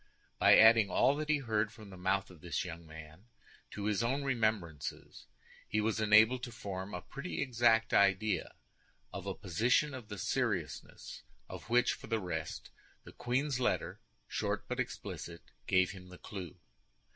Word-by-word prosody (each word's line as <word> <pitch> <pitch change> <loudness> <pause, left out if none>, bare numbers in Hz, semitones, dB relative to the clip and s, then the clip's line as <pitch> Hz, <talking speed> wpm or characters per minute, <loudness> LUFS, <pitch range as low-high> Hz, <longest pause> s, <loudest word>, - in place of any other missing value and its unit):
By - - +7
adding 110 -2 +7
all 135 +9 +3
that 155 0 -4
he 155 - +4
heard 110 -5 -1
from 105 -3 -13
the - - -10
mouth 95 +1 -1
of 85 -4 -16
the 85 - -10
young 85 -1 -8
man 80 +4 -12 0.4
to 100 - -6
his 105 0 +1
own 135 +5 0
remembrances, 110 - -2 0.4
he 110 - 0
was 110 +1 0
enabled 110 +4 +5
to 120 - -6
form 100 -4 -6
a 90 - -6
pretty 155 +6 -6
exact 115 -3 +2
idea 100 -1 +2 0.6
of - - -6
a - - -3
position 125 - +1
of 125 -5 -8
the 105 -1 -7
seriousness - - -3 0.3
of - - -9
which, 120 +1 +3
for - - -10
the 115 -1 0
rest, 80 -5 -5 0.3
the - - -12
queen's 130 +2 -1
letter, 125 - -1 0.3
short - - -2
but - - -4
explicit, 85 -1 -5 0.2
gave 95 -1 +3
him 90 -2 -11
the 90 - -11
clue. 95 -5 -8
105 Hz, 165 wpm, -33 LUFS, 90-120 Hz, 0.6 s, By